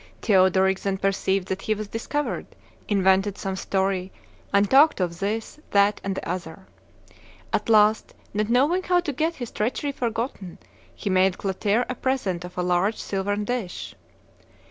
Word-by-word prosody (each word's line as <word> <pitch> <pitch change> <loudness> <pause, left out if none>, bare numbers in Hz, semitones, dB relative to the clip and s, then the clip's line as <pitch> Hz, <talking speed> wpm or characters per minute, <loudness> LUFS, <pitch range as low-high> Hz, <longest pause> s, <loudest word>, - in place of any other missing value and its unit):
Theodoric 190 -2 +4
then 195 -1 -1
perceived 195 -1 0
that 190 0 -2
he 215 - 0
was 215 0 -5
discovered, 285 +7 -3 0.4
invented 195 0 +2
some 190 -1 -3
story, 190 -1 -1 0.4
and 200 0 +4
talked 280 +5 +5
of 175 -2 -2
this, 215 +7 -3
that, 200 +1 +3
and 195 -1 -2
the - - -5
other. 180 +1 -5 0.9
At - - 0
last, 215 0 +4 0.2
not 210 +1 -1
knowing 285 +10 +3
how 360 -1 +2
to 315 -5 -3
get 320 +5 -1
his 245 -3 -6
treachery 250 +6 -1
forgotten, 230 -7 -4 0.4
he 200 - -3
made 185 0 +3
Clotaire 205 +4 0
a - - -2
present 240 -10 -1
of 180 0 -10
a 180 - 0
large 180 +4 +1
silvern 205 +1 -2
dish. 230 -6 -4
200 Hz, 155 wpm, -24 LUFS, 190-230 Hz, 0.9 s, talked